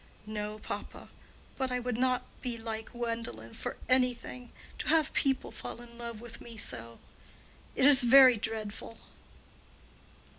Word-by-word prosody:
"No, 210 0 -4
papa. - - -7 0.5
But 265 -1 -1
I 250 - 0
would 250 -1 -2
not 250 +1 +1 0.2
be 245 -2 -3
like 225 -1 -5
Gwendolen 230 - -4
for - - -5
any 255 -1 +3
thing—to 250 +1 -8
have 315 -1 +3
people 270 -2 +1
fall - - -7
in 240 -1 -13
love 235 -2 -6
with 240 -1 -10
me 230 -1 -10
so. 115 - -4 0.8
It 265 - +3
is 280 -1 +9
very 255 +1 +8
dreadful." 220 0 -5
235 Hz, 140 wpm, -31 LUFS, 220-255 Hz, 0.8 s, is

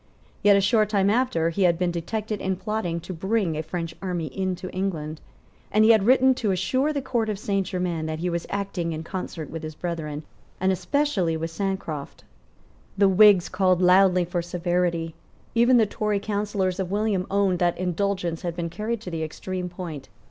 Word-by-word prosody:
Yet, 205 -1 +6
a - - +3
short 210 +2 +3
time 200 -2 +2
after, 210 -9 +1
he 180 - -3
had 175 -2 +4
been 180 0 0
detected 210 +5 -3
in 190 0 0
plotting 185 -3 -2
to 185 - -7
bring 190 0 0
a 155 - -1
French 165 0 -5
army 175 -7 -3
into 185 -1 -2
England; 160 -5 -3 0.5
and 215 +1 +4
he 225 - +7
had 215 -2 +4
written 260 +1 +6
to 215 - +1
assure 255 - +1
the 285 -3 -3
Court 235 -4 -1
of 210 - -2
Saint 195 -2 -1
Germains 180 -4 -2
that 155 0 -3
he 175 +3 -2
was 170 -1 -2
acting 190 -4 -2
in 155 +1 -5
concert 170 -4 -6
with 165 0 -5
his 155 -1 -7
brethren, 160 -3 -4 0.4
and 190 +1 +2
especially 190 - 0
with 165 +1 -4
Sancroft. 170 -6 -4 0.7
The 200 0 +5
Whigs 195 -2 +6
called 185 -1 +2
loudly 180 0 +5
for 175 0 -2
severity. 175 -1 -1 0.4
Even 240 +2 +5
the 225 - +5
Tory 210 0 -1
counsellors 200 -2 -1
of 185 -2 -2
William 205 -2 0
owned 195 -2 +1
that 175 -1 +1
indulgence 180 -1 -1
had 170 -2 -3
been 170 -1 -3
carried 215 +5 -3
to 180 - -7
the 165 -1 -3
extreme 180 +3 -4
point. 170 -5 -7
185 Hz, 190 wpm, -25 LUFS, 170-205 Hz, 0.7 s, he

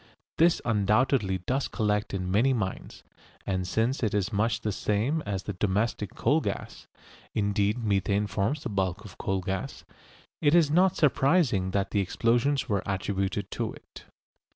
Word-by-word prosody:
This 165 +1 +4
undoubtedly 105 -1 +2
does 135 +2 0
collect 105 -2 -1
in 90 -2 -3
many 120 +7 +3
mines, 100 -6 -4 0.4
and 95 -1 -1
since 115 +8 0
it 110 -4 0
is 100 0 -1
much 105 +1 +1
the 105 - -1
same 110 +11 0
as 95 -2 -2
the 105 - -4
domestic 105 +1 -1
coal 145 +7 +2
gas - - -5 0.5
(indeed 105 +1 +1
methane 100 -2 +1
forms 105 +8 -1
the - - -3
bulk 95 0 -2
of 100 - -12
coal 95 -1 -1
gas) 95 0 -4 0.6
it 145 +1 +4
is 160 -4 +4
not 185 +3 +4
surprising 135 - +2
that 100 +1 -1
the 105 - +1
explosions 120 +9 +1
were 100 -5 0
attributed 100 0 -2
to - - -3
it. - - -14
105 Hz, 155 wpm, -27 LUFS, 95-125 Hz, 0.6 s, This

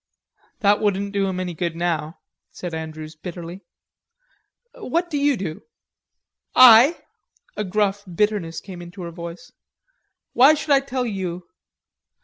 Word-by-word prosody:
"That 205 -1 +4
wouldn't 200 -1 -1
do 200 -1 +1
him 185 -1 -3
any 180 -1 -3
good 170 0 -3
now," 165 -2 -3 0.3
said 175 -2 -7
Andrews 155 -1 -7
bitterly. 175 +2 -8 1.1
"What 345 - -2
do 295 - -1
you 285 -2 +2
do?" 165 -5 -5 0.9
"I?" 255 +5 +8 0.6
a 210 - -2
gruff 200 0 0
bitterness 190 -3 -1
came 185 -3 -10
into 175 +2 -9
her 170 - -6
voice. 170 0 -9 0.8
"Why 270 +5 +6
should 300 0 -4
I 275 - +6
tell 260 -2 -3
you? 185 -5 -4
190 Hz, 130 wpm, -22 LUFS, 170-220 Hz, 1.1 s, I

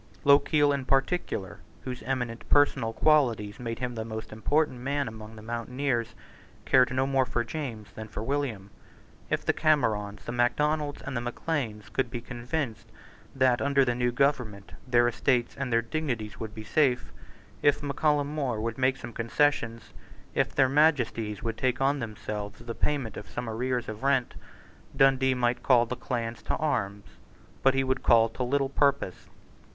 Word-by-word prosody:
Lochiel 145 +1 +5
in 140 -1 -2
particular, 135 - -1 0.2
whose 125 -1 -5
eminent 125 -3 -3
personal 145 -6 +3
qualities 115 -7 +2
made 115 -2 -4
him 125 -1 -3
the 110 -1 -4
most 110 -1 -6
important 130 +4 +1
man 140 +2 -1
among 110 0 -9
the 110 - -11
mountaineers, 120 +1 -2 0.5
cared 125 -1 +5
no 130 +1 +1
more 135 -1 +2
for 120 -1 -1
James 115 -6 -6
than 110 +1 -8
for 105 - -6
William. 115 -7 -2 0.6
If - - -1
the - - +3
Camerons, 105 - +1
the - - -4
Macdonalds, 145 +5 0
and 135 - -5
the 120 - -1
Macleans 120 -3 -3
could 130 -2 0
be 120 - -4
convinced 120 0 -4 0.4
that, 130 -2 +3
under 140 -1 +3
the 120 - +1
new 125 0 0
government, 120 -7 0 0.2
their 120 -1 +4
estates 120 0 +1
and 135 -2 -3
their 115 0 +3
dignities 115 -5 -3
would 110 -2 -6
be 110 - -7
safe, 125 -1 +1 0.5
if 145 0 +3
Mac 140 -1 -4
Callum 150 -2 +3
More 135 -7 -1
would 115 +2 -3
make 130 +1 +2
some 120 -2 -8
concessions, 115 -1 0 0.4
if - - 0
their 130 - +5
Majesties 125 -8 +2
would 115 -1 -3
take 130 -1 +1
on 140 +2 +2
themselves 105 -2 -5
the 120 0 -5
payment 130 -5 -2
of 95 - -8
some 120 +8 -5
arrears 125 +2 -2
of 110 0 -6
rent, 135 -2 +1 0.6
Dundee 135 -1 +4
might 120 -1 0
call 120 -3 +5
the 125 - -4
clans 120 -2 -4
to - - -2
arms; 105 -10 -1 0.6
but 135 0 +4
he 135 - +2
would 130 0 -1
call 115 -1 +5
to 115 - -8
little 135 +2 +1
purpose. 140 -8 0
125 Hz, 170 wpm, -28 LUFS, 115-140 Hz, 0.6 s, Lochiel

